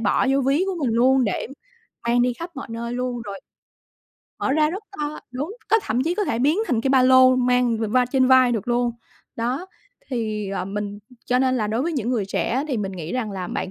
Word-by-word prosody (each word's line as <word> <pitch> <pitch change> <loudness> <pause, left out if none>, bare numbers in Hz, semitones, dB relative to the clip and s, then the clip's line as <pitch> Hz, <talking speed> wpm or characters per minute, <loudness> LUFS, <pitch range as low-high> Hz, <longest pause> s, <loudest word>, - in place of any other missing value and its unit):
bỏ 225 +3 +2
vô 275 - +3
ví 275 +7 +2
của 385 - -1
mình 230 -3 0
luôn 255 +2 +4
để 205 - -2 0.6
mang 240 +1 +3
đi 245 0 +2
khắp 335 +8 -7
mọi 275 - -6
nơi 235 +1 -4
luôn 245 -1 -3
rồi 200 -3 -7 1.0
mở - - 0
ra 305 +1 +3
rất 385 +5 -5 0.2
to 300 0 -3
đúng, 290 - -5
có 445 - +5
thậm 240 - 0
chí 335 +5 0
có 415 +2 0
thể 230 - -1
biến 295 +8 +2
thành 235 -3 +1
cái 265 - -1
ba 265 -1 +5
lô 255 0 +6
mang 250 -2 +2
v 220 - -2
va 250 +2 +4
trên 260 0 +2
vai 255 -1 +6
được 225 +1 -3
luôn. 240 0 +1 0.5
Đó, 250 +10 -2 0.4
thì, 215 -4 -2
ờ, 195 - -2
mình 205 +1 -4 0.3
cho 250 0 +2
nên 260 0 +2
là 215 - 0
đối 220 +4 -1
với 335 +3 -1
những 250 -4 -1
người 225 -6 0
trẻ 195 - -1
á, 260 +4 0
thì 265 - -1
mình 195 -3 -3
nghĩ 170 -2 -6
rằng 240 -4 -2
là 190 -2 -4
bạn - - -3
250 Hz, 240 wpm, -23 LUFS, 225-265 Hz, 1.0 s, lô